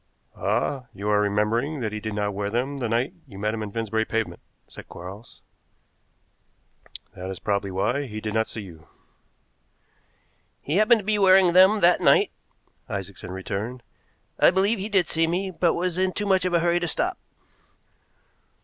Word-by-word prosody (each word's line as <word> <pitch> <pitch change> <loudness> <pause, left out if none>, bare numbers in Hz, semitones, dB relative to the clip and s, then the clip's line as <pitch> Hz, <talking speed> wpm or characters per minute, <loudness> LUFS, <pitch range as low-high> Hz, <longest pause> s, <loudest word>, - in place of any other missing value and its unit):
"Ah, 125 - -1
you 100 +2 -5
are 105 0 +3
remembering 105 +8 0
that 110 -4 -2
he 105 - -4
did 110 -1 -5
not 105 -1 -1
wear 100 +1 -2
them 130 +6 -2
the 120 -3 -2
night 120 +7 0
you 100 -6 -12
met 105 +2 -1
him 110 - -4
in 105 -1 -5
Finsbury 110 0 -1
Pavement," 115 0 -3 0.3
said - - -12
Quarles, 95 +6 -11 1.7
"that 90 +1 -7
is 95 - -5
probably 100 0 -1
why 120 +9 -1
he 110 -2 -6
did 110 -1 -4
not 110 0 +1
see 110 - -6
you." 85 -5 -13 1.7
"He 150 +6 -2
happened 215 +2 +5
to - - -15
be 210 0 +1
wearing 190 -2 +6
them 190 +4 +6
that 175 +1 +4
night," - - +4 0.6
Isaacson 100 -2 -6
returned. 100 +6 -5 0.6
"I - - +7
believe 195 +4 +1
he 200 +3 -4
did 190 -5 +2
see 165 0 +1
me, 185 +3 -1
but 175 -1 +1
was 180 0 -1
in 185 0 +1
too 205 - -3
much 190 -2 +2
of 180 - -1
a 170 - +3
hurry 175 0 +2
to 175 - -2
stop." - - -2
120 Hz, 175 wpm, -24 LUFS, -, 1.7 s, I